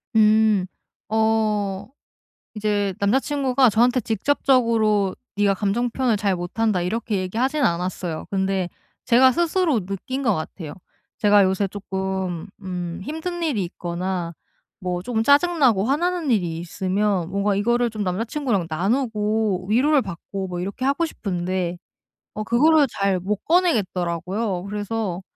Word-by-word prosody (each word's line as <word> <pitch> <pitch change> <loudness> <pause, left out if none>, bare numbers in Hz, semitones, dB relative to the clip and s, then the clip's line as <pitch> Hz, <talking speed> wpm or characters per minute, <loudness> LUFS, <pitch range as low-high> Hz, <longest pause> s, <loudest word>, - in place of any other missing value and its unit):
음. 215 -2 +4 0.4
어. 215 -3 0 0.7
이제 205 -2 0
남자 200 +5 +3
친구가 270 -3 +2
저한테 245 +4 +3
직접적으로 225 -4 +2 0.2
"네가 205 -1 +3
감정 210 +5 0
표현을 240 -2 0
잘 200 -2 0
못한다." 185 +2 -1
이렇게 215 +3 -2
얘기하진 245 +10 -1
않았어요. 175 -3 -1
근데 190 -1 0 0.4
제가 260 +2 +6
스스로 330 - +1
느낀 200 +8 -4
것 225 -7 +2
같아요. 155 0 -6 0.4
제가 205 -1 +5
요새 190 +1 +1
쪼끔 190 -3 -4
음 180 -2 -5
힘든 340 - -4
일이 265 - 0
있거나 175 0 -4 0.5
뭐 180 -1 -2
쪼금 225 +2 -1
짜증나고 285 - +4
화나는 335 +3 0
일이 175 -8 +1
있으면 185 +1 -1
뭔가 200 +1 0
이거를 235 +4 +1
좀 215 -2 -4
남자 185 +4 -1
친구랑 240 - -1
나누고 210 - 0
위로를 275 +6 +4
받고 195 0 -6
뭐 180 -1 -5
이렇게 200 +7 -5
하고 280 +5 +2
싶은데 180 - -3 0.6
어 215 - -3
그거를 290 +7 +4
잘 195 -2 +2
못 200 +3 -3
꺼내겠더라고요. 190 - 0
그래서 205 -2 -3
210 Hz, 295 characters per minute, -22 LUFS, 185-245 Hz, 0.7 s, 제가